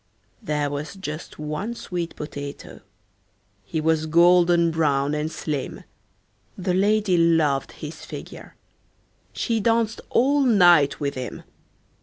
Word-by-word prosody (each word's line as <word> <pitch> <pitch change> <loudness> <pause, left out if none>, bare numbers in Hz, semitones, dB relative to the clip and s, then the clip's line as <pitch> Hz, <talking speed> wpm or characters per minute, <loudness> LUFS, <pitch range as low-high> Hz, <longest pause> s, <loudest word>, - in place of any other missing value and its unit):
"There 145 -1 -1
was 145 +6 -5
just 155 -5 -7
one 155 +10 -4
sweet 175 -6 -5
potato. 145 -1 -8 0.8
He 130 +10 -3
was 160 0 +1
golden 170 +1 +4
brown 145 -3 +1
and 150 +1 -2
slim: 150 -5 -4 0.7
The 185 -1 -1
lady 205 0 +2
loved 160 -5 +2
his 155 0 -9
figure. - - -10 0.8
She 230 -2 -1
danced 225 +1 +1
all 280 +4 +3
night 175 - +5
with 140 -1 -2
him. 130 -1 -6
165 Hz, 115 wpm, -23 LUFS, 150-190 Hz, 0.8 s, night